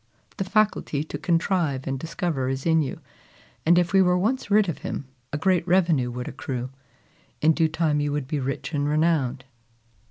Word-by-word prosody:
The 195 - 0
faculty 190 -7 +1
to 155 - -6
contrive 165 -6 0
and 135 -1 -2
discover 160 -4 -2
is 135 0 -3
in 160 -1 +4
you; 135 - -4 0.7
and 175 +1 +6
if 175 +1 +2
we 195 - +6
were 180 -1 +3
once 225 +6 -1
rid 210 0 +4
of 170 - -3
him, 140 - -5 0.3
a 145 - -2
great 180 +1 +1
revenue 170 -8 +3
would 125 +1 -5
accrue. 125 -1 -5 0.7
In 160 +1 +4
due 160 0 +2
time 155 -2 +1
you 145 0 0
would 145 -2 -2
be 150 +1 -2
rich 135 +5 -4
and 145 0 0
renowned." 150 -5 +1
160 Hz, 185 wpm, -25 LUFS, 135-180 Hz, 0.7 s, and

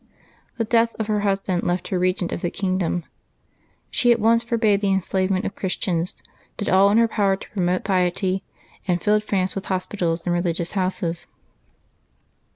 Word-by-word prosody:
The 230 - +1
death 230 +1 +2
of 220 - -1
her 210 0 0
husband 195 -3 0
left 175 0 -1
her 185 - 0
regent 180 -1 0
of - - -3
the 175 - 0
kingdom. 185 -3 -1 0.9
She 245 - +3
at 235 - +3
once 230 +2 +4
forbade 225 -4 +1
the 200 -1 +1
enslavement 190 +1 0
of - - -3
Christians, 180 -2 -2 0.4
did 205 - -2
all 195 +2 +5
in 210 - +3
her 230 0 +5
power 200 -3 +1
to 190 - -11
promote 180 -2 0
piety, 185 0 +1 0.5
and 180 -1 +1
filled 210 +1 +2
France 190 -3 0
with 195 - -5
hos 185 -1 -1
pitals 170 -4 -2
and 175 - +1
religious 175 -1 -1
houses. 185 -3 -2
190 Hz, 170 wpm, -23 LUFS, 180-210 Hz, 0.9 s, all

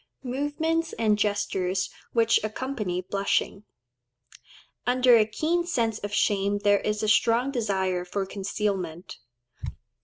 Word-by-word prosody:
Movements 295 +5 -1
and 215 -2 +2
gestures 195 -2 -1 0.2
which 230 -1 +3
accompany 215 -5 -3
Blushing.—Under 125 - -2
a 215 -2 +4
keen 315 +10 0
sense 225 -9 0
of 205 - -5
shame 200 -1 +1
there 205 0 +3
is 210 0 -2
a - - +1
strong 230 +4 +3
desire 190 -7 -1
for 195 +2 -3
concealment. 190 -3 -4
210 Hz, 110 wpm, -26 LUFS, 190-235 Hz, 0.2 s, a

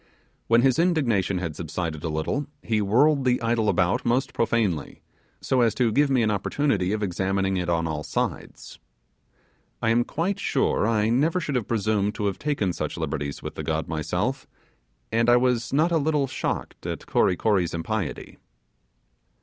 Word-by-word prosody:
When 115 +1 +4
his 130 0 +3
indignation 125 - +1
had 85 -4 -4
subsided 80 -1 -4
a 80 - -2
little 80 - -2 0.2
he 110 -2 0
whirled 135 +8 +3
the 125 -1 +2
idol 115 -2 +1
about 90 0 +1
most 120 +3 0
profanely, 105 -10 0 0.4
so 130 -1 +1
as 115 -2 +2
to 120 -3 +2
give 145 +5 +3
me 130 -3 +3
an 110 - +2
opportunity 100 -1 0
of 105 0 -1
examining 95 0 0
it 90 -1 -2
on 85 -1 +1
all 75 -2 -3
sides. - - -4 1.0
I 115 - +1
am 120 +1 +3
quite 185 +10 -2
sure 135 - +1
I 110 -1 +2
never 150 +9 +2
should 150 -4 -3
have 125 -5 -1
presumed 105 -2 0
to 105 - -2
have 100 - -1
taken 140 -12 -1
such - - -4
liberties 70 -1 -4
with - - -5
the - - -6
god 80 0 -2
myself, 80 -2 -2 0.6
and 115 +1 +2
I 120 - +7
was 125 -2 +1
not 155 +5 +2
a 165 - +3
little 150 -1 +1
shocked 130 - -4
at - - -5
Kory 90 - +2
Kory's 90 -4 +1
impiety. 95 0 -4
110 Hz, 175 wpm, -25 LUFS, 90-130 Hz, 1.0 s, I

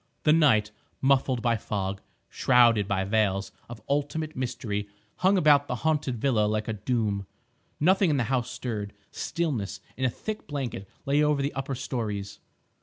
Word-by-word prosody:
The 150 - +5
night, 120 -10 +4 0.3
muffled 130 -2 +2
by 120 -2 +2
fog, 100 -2 -3 0.3
shrouded 120 -5 +4
by 95 -1 0
veils 100 -1 +1 0.2
of 120 -2 -9
ultimate 145 +2 -1
mystery, 115 -5 -3 0.3
hung 190 +2 +3
about 145 -4 +5
the 125 - -2
haunted 150 -5 +1
villa 110 -3 +2
like 110 +1 -1
a 110 - -1
doom. 105 -2 -1 0.5
Nothing 185 +3 +4
in 145 - +2
the 125 - +2
house 125 0 -1
stirred. 105 -6 -4 0.2
Stillness, 120 - -2 0.2
in 130 - -4
a 130 - +4
thick 215 - -6
blanket, 130 -9 -4 0.2
lay 140 +2 +3
over 150 -2 +2
the 140 - -1
upper 135 0 -3
storeys. 105 -6 -4
125 Hz, 160 wpm, -27 LUFS, 105-145 Hz, 0.5 s, The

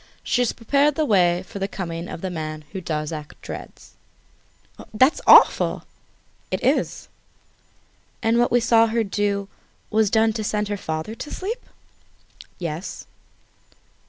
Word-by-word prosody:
She 250 - +1
has 245 - +2
prepared 280 +5 +1
the 310 - +1
way 180 -6 +3
for 200 - -9
the 195 - -1
coming 170 -3 -5
of - - -7
the 190 - -3
man 155 -2 -5
whom 190 - -5
Darzac 155 -2 -5
dreads." - - -9 1.0
"That's 260 +7 +3
awful!" - - +6 0.7
"It - - -3
is!" - - 0 1.2
"And 225 +1 +3
what 240 - +2
we 245 0 +4
saw 230 0 +4
her 225 +1 0
do 200 -1 -1 0.4
was 215 -1 +3
done 220 +1 +3
to 215 0 -3
send 210 0 -1
her 205 - -1
father 160 +1 -4
to 295 - -8
sleep?" 450 +6 -4 0.9
"Yes." 170 +1 -5
205 Hz, 140 wpm, -23 LUFS, 175-230 Hz, 1.2 s, awful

